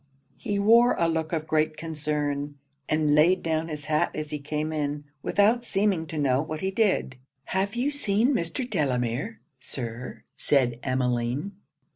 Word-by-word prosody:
He 205 Hz, -, -2 dB
wore 230 Hz, +4 st, +5 dB
a 170 Hz, -, +2 dB
look 160 Hz, -1 st, -1 dB
of 160 Hz, -2 st, -1 dB
great 155 Hz, 0 st, +1 dB
concern; 150 Hz, -2 st, -2 dB, 0.3 s
and 155 Hz, -1 st, +2 dB
laid 170 Hz, +5 st, +4 dB
down 160 Hz, 0 st, 0 dB
his 150 Hz, -2 st, -5 dB
hat 155 Hz, 0 st, +2 dB
as 155 Hz, -1 st, -4 dB
he 150 Hz, -, -3 dB
came 150 Hz, +2 st, -3 dB
in, 145 Hz, -1 st, -2 dB, 0.2 s
without 220 Hz, +8 st, +3 dB
seeming 195 Hz, -7 st, 0 dB
to 155 Hz, -, -6 dB
know 135 Hz, -2 st, +2 dB
what 155 Hz, 0 st, -5 dB
he 190 Hz, -, -1 dB
did. 190 Hz, -, +1 dB, 0.3 s
'Have 195 Hz, +3 st, -1 dB
you 255 Hz, +4 st, 0 dB
seen 240 Hz, -2 st, +2 dB
Mr. 200 Hz, +3 st, -2 dB
Delamere, 140 Hz, -, -1 dB, 0.2 s
Sir?' 120 Hz, -1 st, -6 dB
said 125 Hz, -4 st, +2 dB
Emmeline. 125 Hz, +5 st, -1 dB
155 Hz, 155 wpm, -26 LUFS, 145-195 Hz, 0.3 s, wore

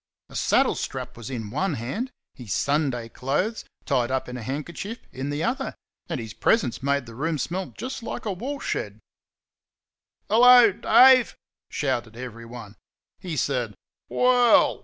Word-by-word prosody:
A -, -, -13 dB
saddle -, -, +3 dB
strap -, -, -5 dB
was 115 Hz, 0 st, -8 dB
in 110 Hz, -5 st, -5 dB
one 160 Hz, -, -1 dB
hand, 135 Hz, -, -4 dB, 0.2 s
his 120 Hz, -7 st, -10 dB
Sunday 140 Hz, -, 0 dB
clothes, 145 Hz, -, -2 dB, 0.2 s
tied 125 Hz, -5 st, +1 dB
up 130 Hz, 0 st, -1 dB
in 125 Hz, -, -6 dB
a 125 Hz, -, -6 dB
handkerchief, 155 Hz, -, -5 dB
in 135 Hz, +2 st, -5 dB
the 145 Hz, +2 st, -2 dB
other, 265 Hz, +4 st, -2 dB, 0.3 s
and 165 Hz, -, -2 dB
his 110 Hz, -2 st, -7 dB
presence 150 Hz, -, +1 dB
made 140 Hz, 0 st, 0 dB
the 115 Hz, -, -11 dB
room 155 Hz, +6 st, -2 dB
smell 180 Hz, +7 st, -3 dB
just 265 Hz, +1 st, -5 dB
like 230 Hz, -, -6 dB
a 210 Hz, -, -1 dB
woolshed. 275 Hz, +9 st, -4 dB, 1.3 s
"Hello, 245 Hz, 0 st, +7 dB
Dave!" 250 Hz, +4 st, +6 dB, 0.3 s
shouted 120 Hz, -5 st, -2 dB
everyone. 115 Hz, -3 st, -9 dB, 0.4 s
He 170 Hz, -4 st, -5 dB
said 120 Hz, -5 st, -1 dB, 0.3 s
"Well!" 250 Hz, -2 st, +4 dB
140 Hz, 145 wpm, -25 LUFS, -, 1.3 s, Hello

